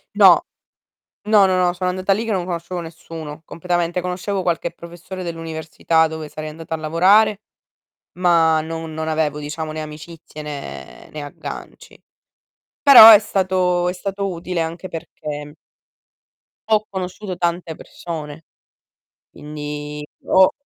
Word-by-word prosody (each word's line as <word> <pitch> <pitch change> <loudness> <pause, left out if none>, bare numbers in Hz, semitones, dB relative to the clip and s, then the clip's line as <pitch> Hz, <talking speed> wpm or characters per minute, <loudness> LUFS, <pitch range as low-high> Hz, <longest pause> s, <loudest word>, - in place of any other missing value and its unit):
No, - - +7 0.8
no, 210 -2 +5
no, 185 -1 +2
no, 180 -1 +2
sono 180 0 -2
andata 185 +2 +1
lì 215 +4 -2
che 225 - -3
non 185 -3 -1
conoscevo 175 0 -4
nessuno, 160 -2 -9
completamente. 175 +1 -2
Conoscevo 180 +2 -3
qualche 170 -1 -1
professore 175 +2 -10
dell'università 160 -1 -1
dove 160 -1 -7
sarei 155 +1 -6
andata 160 +1 -8
a - - -1
lavorare, 195 +7 +3 0.7
ma 165 -3 +3
non 160 0 -6
non 160 0 -3
avevo 155 -2 0
diciamo, 155 +1 -5
né 155 - -4
amicizie 155 0 -10
né 140 - -8
né 150 - -6
agganci. 145 - -10 0.8
Però 250 -6 +11
è 210 - +9
stato 185 -3 0
è 180 - 0
stato 195 +1 -3
utile, 175 0 -4
anche 165 +3 -4
perché 150 -2 -7 1.2
ho 215 -1 +3
conosciuto 190 +1 -5
tante 170 -1 -2
persone, 155 -2 -8 0.9
quindi 150 0 -7 0.2
ho 190 0 +5
170 Hz, 130 wpm, -20 LUFS, 155-185 Hz, 1.2 s, Però